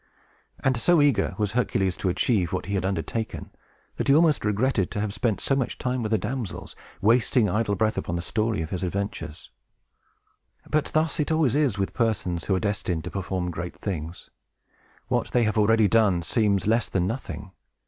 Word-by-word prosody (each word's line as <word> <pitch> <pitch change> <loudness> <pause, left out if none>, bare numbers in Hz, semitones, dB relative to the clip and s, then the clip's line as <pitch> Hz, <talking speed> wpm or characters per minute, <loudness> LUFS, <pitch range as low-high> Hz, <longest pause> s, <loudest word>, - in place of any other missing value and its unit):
And 130 -1 +3
so 175 +7 +4
eager 135 -11 +2
was 105 -2 0
Hercules 95 -6 0
to 95 - -1
achieve 95 -1 +1
what 95 - -2
he 100 - -4
had 95 -1 0
undertaken, 105 +3 -3 0.5
that - - -2
he 140 - +6
almost 160 -2 +4
regretted 105 -1 +1
to - - -4
have 105 -1 -2
spent 110 -1 0
so 135 - +1
much 135 -3 -2
time 125 0 -2
with 110 -1 -3
the 110 - +4
damsels, 120 -1 -5 0.3
wasting 115 +2 +3
idle 105 +1 0
breath 110 +3 +1
upon 85 - -3
the 85 - -3
story 110 -2 -1
of 80 - -7
his 90 - -3
adventures. 95 -4 -4 1.2
But 155 -1 +1
thus 155 +1 0
it 150 - 0
always 155 -5 +2
is 140 -8 +2
with 95 -1 -2
persons 95 -8 -1
who 95 - +1
are - - +1
destined 95 -5 -2
to 90 - -6
perform 95 -2 -3
great 85 +1 -6
things. 85 -3 -5 0.8
What - - 0
they 120 - +2
have 110 -1 0
already 110 0 +4
done 100 -6 +3
seems 100 +2 +1
less 115 0 +2
than 90 -2 0
nothing. 100 -3 -5
105 Hz, 190 wpm, -25 LUFS, 95-120 Hz, 1.2 s, he